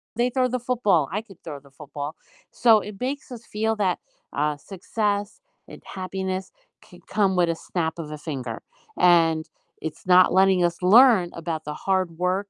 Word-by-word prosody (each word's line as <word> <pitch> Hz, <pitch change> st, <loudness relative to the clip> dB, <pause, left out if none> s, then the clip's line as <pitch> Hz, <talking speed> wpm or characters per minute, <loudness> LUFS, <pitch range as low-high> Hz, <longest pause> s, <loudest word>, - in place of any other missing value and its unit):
They 240 Hz, +1 st, +1 dB
throw 255 Hz, 0 st, +2 dB
the 255 Hz, +1 st, -2 dB
football, 210 Hz, -, +1 dB
I 210 Hz, +4 st, -2 dB
could 195 Hz, -5 st, -17 dB
throw 145 Hz, -3 st, -7 dB
the 140 Hz, -1 st, -20 dB
football." 145 Hz, 0 st, -6 dB, 0.4 s
So, 225 Hz, -3 st, +5 dB
it 205 Hz, -, -9 dB
makes 265 Hz, +1 st, -4 dB
us 235 Hz, -1 st, -8 dB
feel 220 Hz, +1 st, -1 dB
that, 190 Hz, -4 st, +1 dB, 0.4 s
uh, 150 Hz, +1 st, 0 dB
success 205 Hz, +4 st, -3 dB, 0.3 s
and -, -, -12 dB
happiness 190 Hz, 0 st, -4 dB, 0.3 s
can -, -, -17 dB
come 195 Hz, -3 st, +1 dB
with 175 Hz, -1 st, +3 dB
a 165 Hz, -, 0 dB
snap 165 Hz, -1 st, -3 dB
of 150 Hz, -2 st, -6 dB
a 150 Hz, -, -6 dB
finger, 125 Hz, -5 st, -5 dB, 0.4 s
and 165 Hz, -3 st, +4 dB, 0.4 s
it's 160 Hz, +2 st, -7 dB
not 180 Hz, 0 st, +6 dB
letting 190 Hz, -1 st, +4 dB
us 170 Hz, 0 st, +1 dB
learn 210 Hz, -2 st, +6 dB
about 165 Hz, -1 st, -4 dB
the 150 Hz, -, -4 dB
hard 190 Hz, -2 st, +1 dB, 0.2 s
work 195 Hz, +2 st, -1 dB
185 Hz, 180 wpm, -24 LUFS, 160-210 Hz, 0.4 s, not